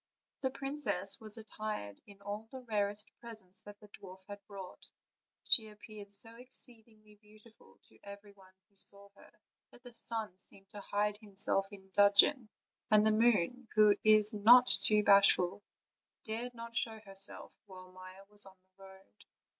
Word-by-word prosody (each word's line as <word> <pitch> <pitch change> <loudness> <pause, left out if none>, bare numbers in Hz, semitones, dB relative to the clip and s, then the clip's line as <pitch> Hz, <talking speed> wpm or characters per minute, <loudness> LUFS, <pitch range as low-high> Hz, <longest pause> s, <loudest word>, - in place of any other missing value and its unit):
The 265 - -1
princess 275 +1 -2
was 215 +1 +1
attired 215 - -8
in 200 -1 -17
all 205 +2 -7
the 260 - -10
rarest 210 -3 0
presents 215 -6 -14
that 205 0 -13
the 210 - -17
dwarf 190 -1 -14
had 205 -1 -11
brought; 195 -3 -9 0.6
she 220 -2 +3
appeared 210 -1 -9
so 225 +3 +2
exceedingly 225 -4 -6
beautiful 215 - -21
to 110 - -25
everybody 200 -2 -15
who 200 - -40
saw 200 +1 +4
her - - -19 0.4
that 245 - -21
the 245 -1 -14
sun 225 -4 0
seemed 195 0 -22
to 205 - -10
hide 205 +1 -3
himself 195 -2 0
in 190 -1 -15
dudgeon, 205 +5 +3 0.4
and 215 0 +3
the 220 - +3
moon, 230 +2 0
who 210 -1 +4
is 215 0 +4
not 235 +5 +6
too 210 -3 +4
bashful, 200 -1 +3 0.6
dared 235 +3 -6
not 230 0 -11
show 225 -1 -1
herself 195 -1 -6
while 185 -1 -14
Maia 185 +1 -14
was 205 -1 +1
on 190 - -16
the 185 +1 -23
road. 190 - -19
210 Hz, 155 wpm, -32 LUFS, 195-225 Hz, 0.6 s, not